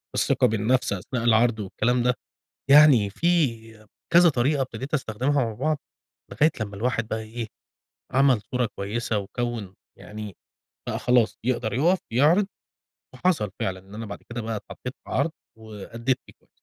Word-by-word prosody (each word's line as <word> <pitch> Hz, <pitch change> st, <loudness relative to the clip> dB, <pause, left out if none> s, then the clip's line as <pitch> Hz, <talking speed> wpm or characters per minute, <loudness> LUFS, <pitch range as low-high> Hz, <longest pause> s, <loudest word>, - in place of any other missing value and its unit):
الثقة 125 Hz, -, +3 dB
بالنفس 110 Hz, +1 st, +1 dB
أثناء 115 Hz, +5 st, -4 dB
العرض 115 Hz, 0 st, +3 dB
والكلام 120 Hz, +5 st, 0 dB
ده، 125 Hz, 0 st, +3 dB, 0.6 s
يعني 140 Hz, -8 st, +7 dB
في 115 Hz, -, 0 dB, 0.3 s
كذا 175 Hz, +1 st, +7 dB
طريقة 140 Hz, 0 st, +1 dB
ابتديت 130 Hz, +3 st, -5 dB
أستخدمها 130 Hz, +1 st, 0 dB
مع 115 Hz, -, -3 dB
بعض، 150 Hz, +7 st, -1 dB, 0.5 s
لغاية 155 Hz, +2 st, +4 dB
لما 100 Hz, -2 st, -4 dB
الواحد 115 Hz, +1 st, -1 dB
بقى 110 Hz, -, -2 dB
إيه، 115 Hz, +1 st, -6 dB, 0.7 s
عمَل 135 Hz, -3 st, +4 dB
صورة 125 Hz, -3 st, 0 dB
كويسة، 105 Hz, +2 st, -1 dB
وكوِّن 110 Hz, -1 st, -4 dB, 0.2 s
يعني 105 Hz, -2 st, -8 dB, 0.6 s
بقى -, -, -2 dB
خلاص 125 Hz, -2 st, +2 dB
يقدر 120 Hz, -2 st, -1 dB
يقف، 170 Hz, +9 st, +3 dB
يعرض، 160 Hz, -, +4 dB, 0.7 s
وحصل 160 Hz, -, +1 dB
فعلًا، 95 Hz, -1 st, -2 dB
إن 95 Hz, +2 st, -15 dB
أنا 110 Hz, +1 st, -6 dB
بعد 100 Hz, -, -8 dB
كده 120 Hz, -, -4 dB
بقى 110 Hz, 0 st, -3 dB
اتحطيت 125 Hz, +4 st, -7 dB
في -, -, -12 dB
عرض 145 Hz, +5 st, +1 dB, 0.3 s
وأدّيت 110 Hz, +3 st, -3 dB
فيه -, -, -15 dB
كويس. -, -, -33 dB
120 Hz, 150 wpm, -25 LUFS, 110-135 Hz, 0.7 s, يعني